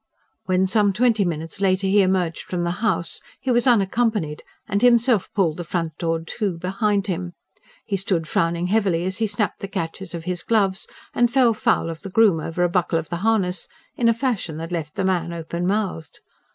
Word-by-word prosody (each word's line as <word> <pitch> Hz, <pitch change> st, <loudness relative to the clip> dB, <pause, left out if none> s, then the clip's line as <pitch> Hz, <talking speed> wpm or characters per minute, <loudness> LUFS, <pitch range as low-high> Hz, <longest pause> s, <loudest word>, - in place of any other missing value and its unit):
When 185 Hz, 0 st, +2 dB
some 205 Hz, 0 st, +2 dB
twenty 225 Hz, 0 st, +3 dB
minutes 165 Hz, +1 st, -4 dB
later 190 Hz, 0 st, +2 dB
he 200 Hz, +2 st, +4 dB
emerged 185 Hz, -3 st, +1 dB
from 175 Hz, -1 st, -2 dB
the 170 Hz, -, 0 dB
house, 175 Hz, -6 st, 0 dB, 0.2 s
he 260 Hz, -, -1 dB
was 240 Hz, +2 st, +2 dB
unaccompanied, 210 Hz, -7 st, +1 dB, 0.3 s
and 200 Hz, -1 st, 0 dB
himself 235 Hz, -4 st, +4 dB
pulled 170 Hz, -6 st, +1 dB
the 175 Hz, -, -4 dB
front 165 Hz, -2 st, -3 dB
door 165 Hz, -1 st, 0 dB
to 195 Hz, -2 st, -2 dB
behind 200 Hz, +3 st, 0 dB
him. 180 Hz, -2 st, -3 dB, 0.5 s
He 200 Hz, -, -1 dB
stood 180 Hz, -4 st, -1 dB
frowning 170 Hz, +2 st, 0 dB
heavily 185 Hz, -4 st, +1 dB
as 190 Hz, +3 st, -3 dB
he 225 Hz, -, +1 dB
snapped 205 Hz, -1 st, -2 dB
the 195 Hz, -, -5 dB
catches 175 Hz, 0 st, -5 dB
of 165 Hz, -, -6 dB
his 180 Hz, 0 st, -3 dB
gloves, 195 Hz, -3 st, +1 dB, 0.3 s
and 240 Hz, 0 st, +2 dB
fell 250 Hz, -3 st, +4 dB
foul 220 Hz, -4 st, +1 dB
of 165 Hz, -1 st, -6 dB
the 195 Hz, -, -7 dB
groom 200 Hz, -4 st, +4 dB
over 165 Hz, +3 st, -2 dB
a -, -, +4 dB
buckle 175 Hz, -1 st, +1 dB
of 165 Hz, -1 st, -4 dB
the 170 Hz, -, -2 dB
harness, 190 Hz, -3 st, 0 dB, 0.3 s
in 235 Hz, -1 st, +3 dB
a -, -, +5 dB
fashion 230 Hz, -, -2 dB
that 165 Hz, +2 st, -6 dB
left 160 Hz, -4 st, -4 dB
the 195 Hz, -, -1 dB
man 175 Hz, -3 st, 0 dB
open 170 Hz, +1 st, -3 dB
mouthed. 190 Hz, -6 st, -2 dB
190 Hz, 200 wpm, -22 LUFS, 170-210 Hz, 0.5 s, a